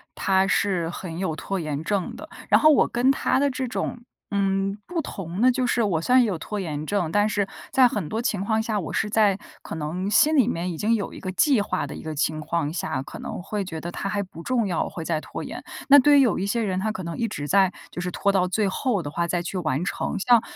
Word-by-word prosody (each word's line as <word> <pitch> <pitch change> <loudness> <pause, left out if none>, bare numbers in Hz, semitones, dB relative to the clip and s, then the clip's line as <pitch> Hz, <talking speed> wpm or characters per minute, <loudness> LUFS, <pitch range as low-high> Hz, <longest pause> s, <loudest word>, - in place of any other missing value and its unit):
他 190 0 +2
是 185 -3 +1
很 170 -1 -6
有 185 -5 -1
拖 195 +3 -3
延 155 -1 -3
症 195 -1 -1
的。 315 - -10 0.2
然 - - +6
后 310 - +7
我 - - +4
跟 250 +3 +2
他 270 - +1
的 280 0 +3
这 260 0 -3
种， 240 0 -3 0.3
嗯， 195 0 0
不 345 -1 -2
同 190 - -5
的 255 +1 +6
就 255 0 0
是 235 -1 +2
我 175 -6 +1
虽 250 +9 +2
然 255 - +8
也 - - +1
有 185 -5 -2
拖 210 +6 -5
延 155 -4 -4
症， 180 -5 -1
但 205 +2 +3
是 205 -2 0 0.3
在 260 -1 +6
很 205 -9 -3
多 225 +2 -2
情 210 -5 -1
况 220 0 +1
下， 220 -2 -1
我 165 - -5
是 210 - 0
在 205 -3 +3 0.2
可 - - -7
能 165 +5 -3
心 305 +9 +4
里 245 -4 +5
面 175 -4 -2
已 165 - -6
经 225 +5 +2
有 205 - -3
一 - - -9
个 185 - -5
计 265 -1 +3
划 205 - -2
的 - - -7
一 - - -8
个 155 -1 -5
情 155 +1 0
况 155 -1 -1
下 130 -6 -2
可 - - -10
能 - - -6
会 205 +1 -3
觉 165 -3 -6
得 175 - -5
它 195 - -4
还 200 0 -1
不 165 -3 -11
重 240 +4 0
要， 175 -5 0
我 - - -5
会 165 - -6
再 160 -2 0
拖 - - -7
延。 - - -7 0.3
那 285 +1 +10
对 290 +2 +6
于 275 - +7
有 240 -6 +2
一 195 - -1
些 230 +2 0
人， 190 -3 -1
他 215 +3 -1
可 185 -3 -6
能 170 0 -5
一 230 - 0
直 145 -8 -5
在 195 0 +4 0.2
就 175 - -5
是 180 - -2
拖 200 +3 +1
到 185 -2 +2
最 205 +2 +1
后 215 -1 0
的 145 - -5
话 170 +2 -1
再 175 0 0
去 185 +2 -4
完 155 -1 -1
成， - - -2
像 240 +2 +5
195 Hz, 290 characters per minute, -24 LUFS, 170-225 Hz, 0.3 s, 那